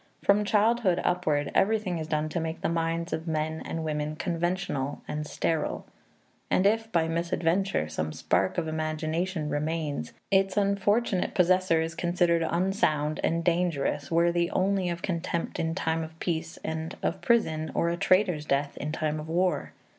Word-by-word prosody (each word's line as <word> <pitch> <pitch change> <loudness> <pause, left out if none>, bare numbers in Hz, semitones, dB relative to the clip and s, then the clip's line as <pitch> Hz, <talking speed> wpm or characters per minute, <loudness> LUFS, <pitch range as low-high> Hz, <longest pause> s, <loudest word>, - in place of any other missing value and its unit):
From 200 +1 +4
childhood 210 -3 +3
upward, 155 -5 +1
everything 195 -4 +2
is 155 - -4
done 155 -1 0
to 170 - -2
make 160 0 -4
the - - 0
minds 165 +1 -1
of 160 +2 -3
men 160 0 -1
and 165 - -4
women 150 -1 -2
conventional 170 -4 -2
and 150 0 -3
sterile. 160 +1 -1 0.6
And 185 - +2
if, 225 +2 +2
by 165 -4 +2
misadventure, 170 - 0
some 80 0 -3
spark 95 +4 0
of 165 -2 0
imagination 155 +2 -2
remains, 150 - -2 0.2
its 195 0 +3
unfortunate 200 0 +1
possessor 180 -2 +3
is 165 +1 -2
considered 175 -1 +2
unsound 165 -3 +1
and 165 +1 +1
dangerous, 165 -5 0
worthy 170 +1 +2
only 190 -1 +1
of 170 0 -4
contempt 170 -1 -2
in 165 0 -1
time 165 -3 0
of 160 0 -9
peace 165 -1 -3
and 160 0 -4
of - - -1
prison 160 -10 +2
or 170 - +2
a 170 - 0
traitor's 180 -4 +2
death 140 +1 0
in 150 - -3
time 155 -1 -1
of 155 +1 -7
war. 170 -3 0
165 Hz, 160 wpm, -28 LUFS, 155-185 Hz, 0.6 s, From